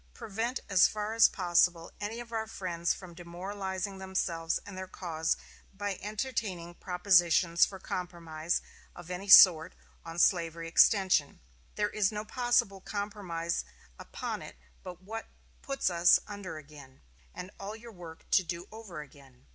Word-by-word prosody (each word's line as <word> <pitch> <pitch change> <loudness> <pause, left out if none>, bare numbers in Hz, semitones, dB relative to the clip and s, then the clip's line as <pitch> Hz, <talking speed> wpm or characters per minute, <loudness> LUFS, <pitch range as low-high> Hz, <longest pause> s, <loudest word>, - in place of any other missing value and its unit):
Prevent 225 +5 -3
as 195 -3 +6
far 210 +1 -4
as 225 - +7
possible 175 -2 +2
any 215 +3 -4
of 240 -1 -9
our 220 -1 -2
friends 170 -5 -2
from 185 -3 -6
demoralizing 190 +3 -5
themselves 170 -3 -1
and 200 - -9
their 185 0 -6
cause 165 -4 -2 0.3
by 200 -1 -4
entertaining 210 -5 -4
propositions 175 -2 +3
for 195 - -9
compromise 170 -3 -3 0.3
of 175 0 -10
any 185 +3 -5
sort 175 -3 +8 0.3
on 165 0 -8
slavery 165 -2 +2
extension. 185 -3 +4 0.4
There 210 0 0
is 210 -2 +1
no 210 0 -5
possible 235 -5 +1
compromise 195 -5 -3 0.4
upon - - -5
it - - -10 0.3
but 180 0 -10
what 225 +3 -6 0.3
puts 275 -8 -1
us 170 0 +5
under 200 -6 -7
again, 145 - -14 0.3
and 185 - -7
all 210 +3 -7
our 235 +1 -11
work 170 -5 -12
to 190 - +5
do 170 +1 -5
over 215 -8 -8
again. 135 -3 -17
185 Hz, 145 wpm, -30 LUFS, 170-205 Hz, 0.4 s, sort